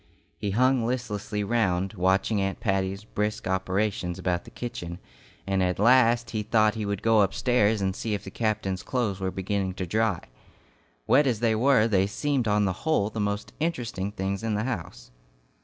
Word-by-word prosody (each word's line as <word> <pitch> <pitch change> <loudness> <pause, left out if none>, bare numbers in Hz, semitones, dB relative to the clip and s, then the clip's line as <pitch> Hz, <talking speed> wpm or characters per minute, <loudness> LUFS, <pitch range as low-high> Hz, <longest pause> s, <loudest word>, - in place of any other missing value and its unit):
He 100 - -3
hung 125 +4 +3
listlessly 110 -4 -2
round, 100 -3 0
watching 95 +2 +1
Aunt 95 0 -2
Patty's 95 -1 -1
brisk 105 0 -3
operations 95 -1 -1
about 90 -1 -1
the - - -11
kitchen, 85 -8 -6 0.5
and 95 -1 0
at 90 -1 +1
last 120 +1 +4
he 110 - -1
thought 110 0 +3
he 110 -2 -4
would 100 -1 -3
go 115 -2 +5
upstairs 105 +1 +2
and 95 -1 0
see 110 -1 -2
if 100 - -6
the 95 - -8
captain's 110 -4 -1
clothes 115 -7 -2
were 95 0 -1
beginning 95 0 -2
to 95 -1 -3
dry. 110 0 0 0.8
Wet 145 -1 +4
as 120 -5 +1
they 115 -1 +2
were, 115 -1 +4
they 100 -3 +2
seemed 135 +2 -1
on 105 0 +2
the 95 - 0
whole 110 -10 +1
the 110 - -5
most 100 0 -2
interesting 120 - -2
things 95 0 -3
in 110 -2 -1
the 105 - -1
house. 90 - -5
105 Hz, 180 wpm, -26 LUFS, 95-115 Hz, 0.8 s, go